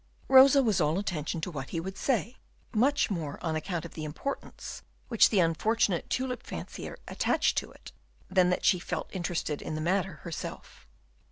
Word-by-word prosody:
Rosa 270 Hz, +1 st, +8 dB
was 210 Hz, -6 st, +2 dB
all 155 Hz, +3 st, +2 dB
attention 170 Hz, -4 st, -2 dB
to 180 Hz, -, -3 dB
what 135 Hz, -4 st, -6 dB
he 165 Hz, -, -2 dB
would 190 Hz, +3 st, -5 dB
say, 245 Hz, +1 st, -1 dB, 0.4 s
much 260 Hz, +3 st, +2 dB
more 160 Hz, -6 st, -3 dB
on 160 Hz, -1 st, 0 dB
account 170 Hz, +1 st, -3 dB
of 170 Hz, -, -9 dB
the 155 Hz, -, -6 dB
importance 155 Hz, -, -6 dB, 0.3 s
which 230 Hz, -3 st, +6 dB
the 205 Hz, -, +2 dB
unfortunate 180 Hz, +3 st, +1 dB
tulip 250 Hz, -1 st, -1 dB
fancier -, -, -7 dB
attached -, -, +1 dB
to -, -, -10 dB
it, -, -, -13 dB, 0.4 s
than 185 Hz, -1 st, +3 dB
that 180 Hz, -, 0 dB
she 180 Hz, -, +5 dB
felt -, -, -4 dB
interested 175 Hz, -5 st, -2 dB
in 155 Hz, -, -4 dB
the -, -, -3 dB
matter 185 Hz, +3 st, 0 dB
herself. 160 Hz, -, -7 dB
180 Hz, 175 wpm, -29 LUFS, 160-225 Hz, 0.4 s, Rosa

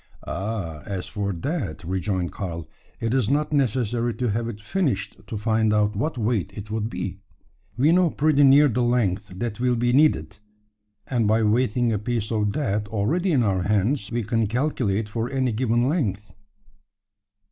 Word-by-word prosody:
"Oh! 95 Hz, -5 st, -4 dB
as 95 Hz, -3 st, -3 dB
for 100 Hz, -2 st, -3 dB
that," 95 Hz, -, -3 dB
rejoined 95 Hz, 0 st, -2 dB
Karl, 85 Hz, -5 st, -5 dB, 0.3 s
"it 115 Hz, +1 st, -1 dB
is 130 Hz, -5 st, +2 dB
not 150 Hz, +2 st, +1 dB
necessary 120 Hz, -3 st, 0 dB
to 125 Hz, -2 st, -1 dB
have 115 Hz, +2 st, -1 dB
it 105 Hz, -3 st, -7 dB
finished 130 Hz, -, -1 dB
to 110 Hz, -, -4 dB
find 110 Hz, 0 st, +1 dB
out 105 Hz, 0 st, +2 dB
what 130 Hz, +8 st, -2 dB
weight 110 Hz, -4 st, 0 dB
it 105 Hz, +1 st, -7 dB
would 110 Hz, 0 st, -1 dB
be. 100 Hz, -4 st, -5 dB, 0.6 s
We 145 Hz, +6 st, +4 dB
know 180 Hz, 0 st, +4 dB
pretty 150 Hz, -1 st, +2 dB
near 140 Hz, +2 st, +7 dB
the 125 Hz, -1 st, 0 dB
length 115 Hz, -5 st, +1 dB
that 110 Hz, +2 st, -4 dB
will 125 Hz, 0 st, +2 dB
be 120 Hz, +1 st, +1 dB
needed, 105 Hz, -, +2 dB, 0.7 s
and 120 Hz, -4 st, 0 dB
by 110 Hz, +1 st, +3 dB
weighing 115 Hz, +1 st, +2 dB
a 105 Hz, -, 0 dB
piece 110 Hz, 0 st, -2 dB
of 105 Hz, -2 st, 0 dB
that 105 Hz, -8 st, -1 dB
already 140 Hz, -, 0 dB
in 135 Hz, -6 st, +3 dB
our 95 Hz, -4 st, +1 dB
hands, 105 Hz, +4 st, 0 dB
we 120 Hz, 0 st, -1 dB
can 115 Hz, +1 st, 0 dB
calculate 115 Hz, -4 st, 0 dB
for 115 Hz, +3 st, -3 dB
any 130 Hz, -2 st, 0 dB
given 120 Hz, +1 st, +1 dB
length." 105 Hz, -, -1 dB
115 Hz, 170 wpm, -24 LUFS, 100-125 Hz, 0.7 s, near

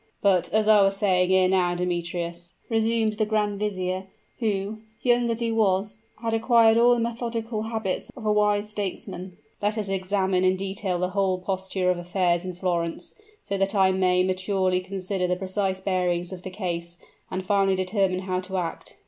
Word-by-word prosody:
"But, 190 Hz, -3 st, +3 dB
as 215 Hz, 0 st, +2 dB
I 215 Hz, -1 st, +7 dB
was 195 Hz, 0 st, +2 dB
saying 185 Hz, -3 st, +2 dB
ere 190 Hz, -1 st, +5 dB
now, 180 Hz, -2 st, +2 dB
Demetrius," 175 Hz, -1 st, -3 dB
resumed 225 Hz, -1 st, +1 dB
the 215 Hz, 0 st, 0 dB
grand 210 Hz, -2 st, 0 dB
vizier, 185 Hz, -2 st, -2 dB, 0.3 s
who, 210 Hz, -2 st, -1 dB, 0.2 s
young 240 Hz, -1 st, +3 dB
as 230 Hz, 0 st, -2 dB
he 230 Hz, -1 st, 0 dB
was, 205 Hz, -1 st, +1 dB, 0.2 s
had 225 Hz, -1 st, -1 dB
acquired 225 Hz, 0 st, +5 dB
all 240 Hz, +1 st, +5 dB
the -, -, -1 dB
methodical 230 Hz, -1 st, -3 dB
habits 220 Hz, -4 st, -3 dB
of 230 Hz, -, -8 dB
a 210 Hz, -, +3 dB
wise 210 Hz, 0 st, +2 dB
statesman, 190 Hz, -3 st, -5 dB, 0.2 s
"let 210 Hz, +2 st, 0 dB
us 210 Hz, -2 st, -2 dB
examine 190 Hz, -1 st, 0 dB
in 185 Hz, 0 st, +4 dB
detail 195 Hz, -1 st, -3 dB
the 180 Hz, +1 st, -1 dB
whole 190 Hz, -1 st, +1 dB
posture 190 Hz, 0 st, -1 dB
of 180 Hz, -, -2 dB
affairs 175 Hz, -1 st, +1 dB
in 185 Hz, -1 st, -5 dB
Florence, 170 Hz, -2 st, -2 dB, 0.3 s
so 200 Hz, -1 st, -3 dB
that 195 Hz, +2 st, 0 dB
I 190 Hz, -1 st, +5 dB
may 185 Hz, -1 st, +3 dB
maturely 185 Hz, 0 st, 0 dB
consider 190 Hz, 0 st, -3 dB
the 180 Hz, -, +1 dB
precise 190 Hz, 0 st, -1 dB
bearings 180 Hz, -2 st, -1 dB
of 180 Hz, -, -8 dB
the 185 Hz, -, -6 dB
case, 175 Hz, -3 st, -4 dB, 0.3 s
and 185 Hz, 0 st, -4 dB
finally 195 Hz, -1 st, +3 dB
determine 185 Hz, 0 st, 0 dB
how 185 Hz, -1 st, -2 dB
to 185 Hz, +1 st, -4 dB
act. 170 Hz, -3 st, -5 dB
190 Hz, 180 wpm, -25 LUFS, 185-210 Hz, 0.3 s, I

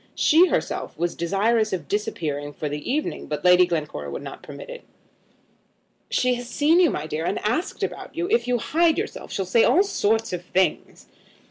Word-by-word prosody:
She 335 Hz, +4 st, +5 dB
herself -, -, -2 dB
was 175 Hz, 0 st, -1 dB
desirous 215 Hz, +6 st, +1 dB
of 170 Hz, -6 st, -4 dB
disappearing 150 Hz, -9 st, -3 dB
for 150 Hz, -, -4 dB
that 145 Hz, -, -5 dB
evening, 255 Hz, -, -3 dB
but 150 Hz, +3 st, -4 dB
Lady 180 Hz, 0 st, +6 dB
Glencora 160 Hz, -4 st, -3 dB
would -, -, -6 dB
not -, -, -8 dB
permit -, -, -10 dB
it. -, -, -9 dB, 1.3 s
"She 250 Hz, 0 st, +2 dB
has 245 Hz, 0 st, -5 dB
seen 295 Hz, +8 st, +3 dB
you, 350 Hz, -3 st, +5 dB
my 150 Hz, -, -3 dB
dear, 155 Hz, 0 st, -3 dB
and 195 Hz, -, -1 dB
asked 305 Hz, -, -1 dB
about -, -, -5 dB
you. 345 Hz, +2 st, -1 dB
If 455 Hz, -, +1 dB
you 250 Hz, 0 st, +2 dB
hide 325 Hz, +7 st, +2 dB
yourself, -, -, -5 dB
she'll 195 Hz, -, -2 dB
say 225 Hz, +5 st, +3 dB
all 375 Hz, -, +5 dB
sorts 225 Hz, -, 0 dB
of 180 Hz, 0 st, -4 dB
things." 185 Hz, +2 st, -1 dB
215 Hz, 190 wpm, -24 LUFS, -, 1.3 s, Lady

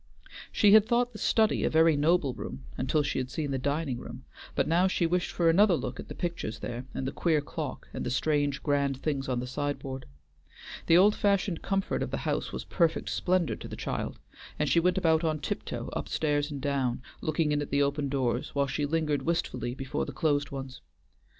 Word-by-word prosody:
She 205 Hz, -, +5 dB
had 215 Hz, 0 st, +7 dB
thought 240 Hz, +1 st, +1 dB
the 215 Hz, -, -9 dB
study 220 Hz, -1 st, +2 dB
a -, -, +2 dB
very 160 Hz, 0 st, +5 dB
noble 150 Hz, -2 st, +2 dB
room 65 Hz, -, -7 dB
until 135 Hz, +4 st, +1 dB
she 145 Hz, -, -1 dB
had 130 Hz, -1 st, -3 dB
seen 145 Hz, 0 st, -3 dB
the 135 Hz, -, -1 dB
dining 140 Hz, -1 st, -1 dB
room, -, -, -9 dB, 0.3 s
but -, -, +1 dB
now 175 Hz, +4 st, +4 dB
she 185 Hz, -2 st, +1 dB
wished 175 Hz, +1 st, 0 dB
for 170 Hz, -, +1 dB
another 185 Hz, +3 st, +5 dB
look -, -, -4 dB
at -, -, -7 dB
the -, -, -8 dB
pictures 170 Hz, -, -3 dB
there 120 Hz, +2 st, -6 dB
and 135 Hz, -, -2 dB
the 135 Hz, -, -2 dB
queer 160 Hz, -3 st, +1 dB
clock, 145 Hz, -1 st, -5 dB
and -, -, -4 dB
the -, -, -2 dB
strange, 145 Hz, +1 st, 0 dB
grand 140 Hz, -2 st, +1 dB
things 140 Hz, -3 st, -1 dB
on 125 Hz, -1 st, 0 dB
the 125 Hz, -, -3 dB
sideboard. 135 Hz, 0 st, -4 dB, 0.8 s
The 165 Hz, -, +7 dB
old 205 Hz, +3 st, +6 dB
fashioned 200 Hz, -4 st, +1 dB
comfort 195 Hz, -1 st, -1 dB
of -, -, -1 dB
the -, -, -2 dB
house -, -, -1 dB
was -, -, -5 dB
perfect 170 Hz, -3 st, +1 dB
splendor 180 Hz, -3 st, +1 dB
to -, -, -8 dB
the -, -, -7 dB
child, -, -, -3 dB, 0.4 s
and 150 Hz, -, 0 dB
she 170 Hz, -, +4 dB
went 180 Hz, +3 st, +2 dB
about 165 Hz, -3 st, +3 dB
on 155 Hz, -1 st, +1 dB
tiptoe 145 Hz, -, -4 dB
up -, -, -4 dB
stairs 145 Hz, -1 st, 0 dB
and 145 Hz, -2 st, -5 dB
down, 135 Hz, -3 st, -1 dB, 0.2 s
looking 155 Hz, 0 st, 0 dB
in 145 Hz, 0 st, +1 dB
at 145 Hz, -, -4 dB
the 140 Hz, +1 st, +3 dB
open 140 Hz, 0 st, -1 dB
doors, 130 Hz, -2 st, -1 dB
while 140 Hz, 0 st, +3 dB
she 145 Hz, +1 st, -1 dB
lingered 150 Hz, -2 st, 0 dB
wistfully 125 Hz, -7 st, -2 dB
before 135 Hz, 0 st, -3 dB
the -, -, -6 dB
closed 145 Hz, -3 st, +1 dB
ones. 135 Hz, -1 st, -7 dB
150 Hz, 215 wpm, -29 LUFS, 135-170 Hz, 0.8 s, had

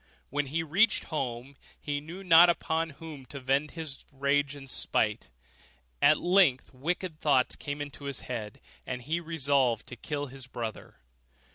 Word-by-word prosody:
When 145 Hz, +1 st, 0 dB
he 160 Hz, +4 st, -1 dB
reached 195 Hz, +8 st, +3 dB
home, 130 Hz, -1 st, -3 dB, 0.2 s
he 145 Hz, -1 st, -3 dB
knew 170 Hz, +6 st, -9 dB
not 175 Hz, -1 st, +8 dB
upon 165 Hz, -1 st, 0 dB
whom 155 Hz, -4 st, -9 dB
to 140 Hz, +3 st, -7 dB
vent 135 Hz, +3 st, 0 dB
his 155 Hz, -4 st, -6 dB
rage 140 Hz, +1 st, +1 dB
and 135 Hz, -1 st, -10 dB
spite; 130 Hz, -, 0 dB, 0.7 s
and 145 Hz, -, +7 dB
at -, -, -4 dB
length 175 Hz, -9 st, +3 dB
wicked 165 Hz, +4 st, -3 dB
thoughts 135 Hz, -4 st, +3 dB
came 145 Hz, 0 st, -5 dB
into 145 Hz, 0 st, -10 dB
his 140 Hz, -2 st, -3 dB
head, 110 Hz, -4 st, -5 dB, 0.2 s
and 125 Hz, -1 st, -5 dB
he 160 Hz, +6 st, -1 dB
resolved 140 Hz, -8 st, +1 dB
to 125 Hz, -, -8 dB
kill 145 Hz, +4 st, -3 dB
his 135 Hz, -1 st, -9 dB
brother. 115 Hz, -4 st, -6 dB
145 Hz, 160 wpm, -29 LUFS, 130-160 Hz, 0.7 s, not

